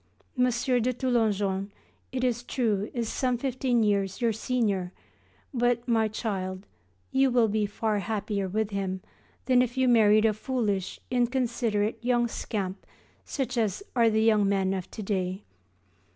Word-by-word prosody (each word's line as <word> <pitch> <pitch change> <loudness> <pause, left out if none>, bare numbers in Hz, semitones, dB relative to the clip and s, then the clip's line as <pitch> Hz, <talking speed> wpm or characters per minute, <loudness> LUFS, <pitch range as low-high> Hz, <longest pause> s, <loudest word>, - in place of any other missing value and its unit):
M. 250 -1 +3
de 250 0 +1
Toulonjon 210 -6 0 0.4
it 255 -1 -2
is 240 -2 +1
true 220 -5 -1
is 235 -2 -2
some 250 +1 0
fifteen 250 -2 0
years 200 -2 0
your 235 -2 +2
senior, 210 -6 -1 0.6
but, 245 -1 +1
my 225 -2 +3
child, 195 -3 -4 0.5
you 270 0 +4
will 240 -2 +4
be 210 0 0
far 210 +1 -1
happier 205 -2 -2
with 215 +2 -1
him 190 -1 -2 0.4
than 255 -1 +4
if 250 +1 -2
you 260 0 +3
married 215 -2 +5
a 220 - +4
foolish, 215 -5 -2
inconsiderate 235 -4 0
young 240 -1 +2
scamp 200 -4 -4 0.4
such 255 -3 -2
as 220 - -1
are 230 -2 +5
the 220 0 +2
young 215 -3 +4
men 195 -1 +1
of 190 -1 -4
to 215 - -7
day. 190 -1 -2
220 Hz, 150 wpm, -27 LUFS, 200-245 Hz, 0.6 s, married